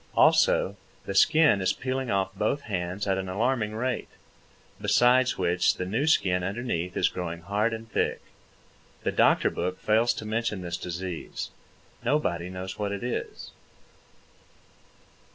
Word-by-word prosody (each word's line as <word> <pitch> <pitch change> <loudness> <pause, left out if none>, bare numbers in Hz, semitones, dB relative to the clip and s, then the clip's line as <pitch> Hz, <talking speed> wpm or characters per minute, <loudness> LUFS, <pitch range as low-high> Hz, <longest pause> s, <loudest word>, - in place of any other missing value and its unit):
Also, 100 +2 +4 0.3
the 100 - -4
skin 155 -1 +5
is 95 +1 +2
peeling 130 0 -3
off 95 -1 0
both 135 +8 -1
hands 90 -2 -3
at 95 -1 +1
an 95 -1 -4
alarming 110 +2 0
rate, 125 +2 -2 0.7
besides 125 +1 +4
which 90 -1 +2
the 90 - -4
new 115 +11 -1
skin 90 - +3
underneath 95 -3 -3
is - - +3
growing 85 -2 -5
hard 105 +5 0
and 115 0 -6
thick. - - 0 0.8
The - - 0
doctor - - +3
book 90 +2 -3
fails 115 +3 +2
to 110 - -6
mention 110 -2 -2
this 85 0 -3
disease. 90 -1 -5 0.5
Nobody 105 - 0
knows 95 +2 -6
what 100 -1 -1
it 100 +2 -4
is. 125 - -4
100 Hz, 140 wpm, -27 LUFS, 90-120 Hz, 0.8 s, skin